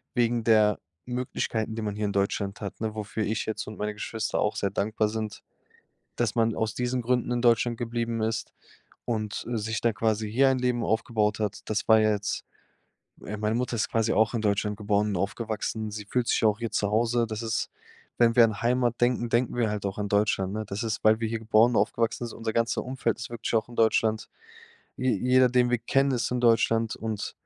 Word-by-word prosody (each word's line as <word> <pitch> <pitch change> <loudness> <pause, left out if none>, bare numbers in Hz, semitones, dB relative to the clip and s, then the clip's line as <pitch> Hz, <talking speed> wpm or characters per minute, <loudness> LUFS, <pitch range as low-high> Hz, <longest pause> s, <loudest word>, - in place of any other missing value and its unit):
wegen 120 -1 +1
der 110 -2 +4 0.3
Möglichkeiten, 120 -3 -2
die 115 - -4
man 105 -1 -2
hier 105 - -1
in 100 - -2
Deutschland 100 +1 -1
hat, 100 -2 -6
ne? 110 -1 -3
Wofür 110 +1 -3
ich 110 +1 -2
jetzt 110 - -4
und 110 - -8
meine 105 0 -2
Geschwister 110 +1 -3
auch 105 - 0
sehr 100 - 0
dankbar 105 +2 0
sind, 110 -1 -5 0.7
dass 115 -3 0
man 115 -1 +1
aus 110 -1 -1
diesen 125 0 -1
Gründen 125 +1 0
in 120 -1 0
Deutschland 120 0 +3
geblieben 115 -1 -2
ist 110 0 -2 0.6
und, 110 -3 -3
äh, 120 - -1
sich 110 0 -2
da 115 -2 +1
quasi 110 +1 0
hier 135 +4 +4
ein 130 - +1
Leben 125 -2 0
aufgebaut 110 -1 0
hat. 105 -1 -2
Das 105 -1 -2
war 110 -1 +7
ja 110 0 +3
jetzt 105 0 -3 0.8
äh, 105 - -5
meine 105 +1 0
Mutter 125 0 -1
ist - - 0
quasi 115 0 +1
auch 110 +1 +3
in 115 - -1
Deutschland 105 0 0
geboren 105 0 +1
und 100 - -1
aufgewachsen. 110 +2 -3
Sie 105 0 -6
fühlt 120 +3 -1
sich - - +1
auch 105 -1 +3
hier 115 -1 -3
zu 100 0 0
Hause. 115 +2 +2
Das 110 0 -4
ist 115 0 -1 0.5
wenn 115 -1 +4
wir 120 - +8
an 110 -2 +1
Heimat 120 0 +1
denken, 120 -1 +2
denken 120 +2 +1
wir 120 -3 +1
halt 105 -1 -3
auch 100 0 -3
an 105 -1 -3
Deutschland, 100 -2 +1
ne? 110 0 -3
Das 100 +4 -4
ist, 110 -2 -2
weil 110 0 +5
wir 115 - 0
hier 115 0 -2
geboren 110 +2 +4
und - - +3
aufgewachsen 115 +1 -1
sind, 115 - -10
unser 115 -1 -3
ganzer 115 0 0
Umfeld 130 -3 -2
ist 120 - -6
wirklich 120 0 -4
auch 110 +1 +1
in 120 - -11
Deutschland. 110 -1 +2 0.7
Je 130 0 +1
jeder, 125 +4 +4
den 125 0 +3
wir 120 - +2
kennen, 135 +4 +2
ist 125 -2 -1
in 125 - 0
Deutschland 115 -1 +3
und 110 -2 -4
110 Hz, 220 wpm, -27 LUFS, 105-120 Hz, 0.8 s, wir